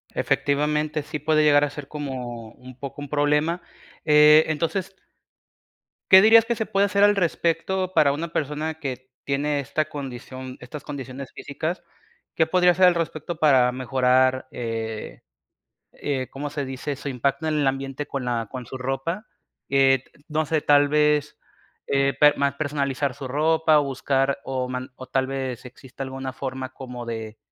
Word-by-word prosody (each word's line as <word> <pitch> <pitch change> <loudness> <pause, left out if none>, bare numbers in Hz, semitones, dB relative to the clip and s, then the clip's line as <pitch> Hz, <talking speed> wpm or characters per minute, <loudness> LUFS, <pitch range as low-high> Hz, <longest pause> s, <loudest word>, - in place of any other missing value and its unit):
Efectivamente, 150 +1 0
sí 150 0 -5
puede 155 +1 +2
llegar 145 -1 +5
a 145 - +1
ser 145 -1 -9
como 125 -6 -6
un 130 0 -13
poco 140 0 -7
un 145 - -7
problema, 150 +4 +1 0.4
eh, 150 0 +7
entonces 175 +5 -2 1.2
¿qué 190 0 +10
dirías 225 +1 +7
que 235 0 -1
se 220 - -2
puede 200 +1 +2
hacer 200 0 +2
al 205 0 +6
respecto 180 +1 0
para 140 -2 +4
una 165 +3 -4
persona 150 +2 -2
que 130 -2 -6
tiene 145 +1 0
esta 155 +3 -1
condición 130 -2 -7
estas 135 +4 -9
condiciones 135 -2 -7
físicas? 165 +4 -5 0.5
¿Qué 160 - +3
podría 180 +1 +4
hacer 185 +2 +4
al 175 - +4
respecto 165 0 -3
para 130 -6 +4
mejorar, 130 0 +2
eh, 115 -2 -5 0.7
eh, 135 -3 -3
cómo 145 +2 -5
se 145 -1 -4
dice, 135 +2 -5
su 140 - -8
impacto 140 +4 -1
en 155 -1 0
el 140 - +2
ambiente 135 +1 -3
con 135 -2 -4
la 115 -3 -2
con 125 -2 -6
su 130 - -7
ropa? 135 +10 -3 0.4
Eh, 135 -1 +4 0.2
no 155 0 0
sé, 155 +2 +1
tal 145 -1 +4
vez 150 -1 +2 0.5
eh, 140 0 +2
per 150 0 +6
mar-personalizar 140 -1 -1
su 130 - -7
ropa 155 +2 +3
o - - +1
buscar 135 +1 0
o 130 -1 -2
man 130 +1 -5
o 130 - -8
tal 130 0 0
vez 130 -3 -4
exista 130 +1 -9
alguna 130 -1 -6
forma 130 -1 -5
como 125 -2 -8
de, 110 -1 -6
140 Hz, 165 wpm, -24 LUFS, 130-155 Hz, 1.2 s, qué